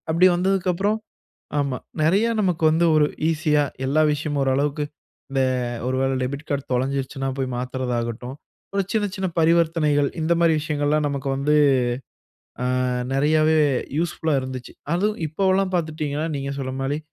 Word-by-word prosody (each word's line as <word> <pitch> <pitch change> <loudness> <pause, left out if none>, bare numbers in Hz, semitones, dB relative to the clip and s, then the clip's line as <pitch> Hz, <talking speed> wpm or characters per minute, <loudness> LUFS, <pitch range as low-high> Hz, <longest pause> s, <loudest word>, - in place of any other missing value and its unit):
அப்படி 170 +3 +5
வந்ததுக்கப்புறம் 190 +2 +1 0.6
ஆமா 140 -3 -1 0.2
நெறைய 190 +9 +3
நமக்கு 180 -5 0
வந்து, 165 +2 +3
ஒரு 150 -1 +5 0.2
ஈஸியா, 155 -2 +2 0.2
எல்லா 145 +4 +2
விஷயமும் 145 -1 -1
ஓரளவுக்கு, 140 +2 0 0.5
இந்த 135 -1 +1 0.5
ஒரு 130 - 0
வேள 135 0 +1
டெபிட் 140 +4 -4
கார்ட் 140 -1 -2
தொலஞ்சிடுச்சுனா 135 +1 -1
போய் 130 -1 -1
மாத்துறதாகட்டும், 125 -1 -3 0.4
ஒரு 200 - +2
சின்ன 220 -2 +1
சின்ன 190 -1 -1
பரிவர்த்தனைகள். 160 -3 +3
இந்த 160 +2 +2
மாரி 170 -1 +4
விஷயங்கள்லாம், 150 0 0
நமக்கு 140 -1 -3
வந்து. 145 +3 +1 1.1
அ, - - 0 0.5
நெறையாவே 155 +3 +3 0.4
யூஸ்ஃபுல்லா 160 -1 -1
இருந்துச்சு. 130 -1 -7 0.2
அதுவும் 205 +4 0
இப்பவெல்லாம் 190 +4 +1
பாத்துட்டிங்கன்னா, 155 -2 -1
நீங்க 140 0 -3
சொன்ன 130 -1 -3
மாரி, 140 +2 -1
150 Hz, 135 wpm, -23 LUFS, 135-170 Hz, 1.1 s, அப்படி